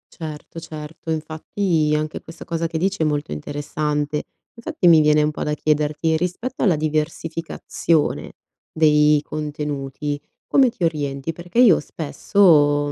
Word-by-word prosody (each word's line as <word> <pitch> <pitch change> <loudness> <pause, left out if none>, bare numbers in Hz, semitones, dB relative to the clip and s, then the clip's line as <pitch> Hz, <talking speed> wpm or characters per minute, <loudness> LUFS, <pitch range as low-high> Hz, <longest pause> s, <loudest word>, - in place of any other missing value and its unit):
Certo, 160 0 -7
certo 160 0 -9
infatti, 160 +1 -1
anche 155 0 -3
questa 165 - -11
cosa 165 0 -2
che 165 0 -4
dici 190 +2 -1
è - - +3
molto 145 - -1
interessante. 145 - -2 0.3
Infatti, 235 - -1
mi 160 -2 +8
viene 150 0 +4
un 150 - +1
po' - - -8
da 150 - -1
chiederti, 150 +1 0
rispetto 180 +10 -3
alla 185 -7 +4
diversificazione, 155 +1 -1 0.4
dei 150 -1 +4
contenuti 145 -1 -4 0.2
come 265 -3 +4
ti 190 - -7
orienti? 145 -2 -1
Perché 175 +6 -9
io 210 -9 +6
spesso, 150 -2 +2
155 Hz, 135 wpm, -21 LUFS, 150-165 Hz, 0.4 s, mi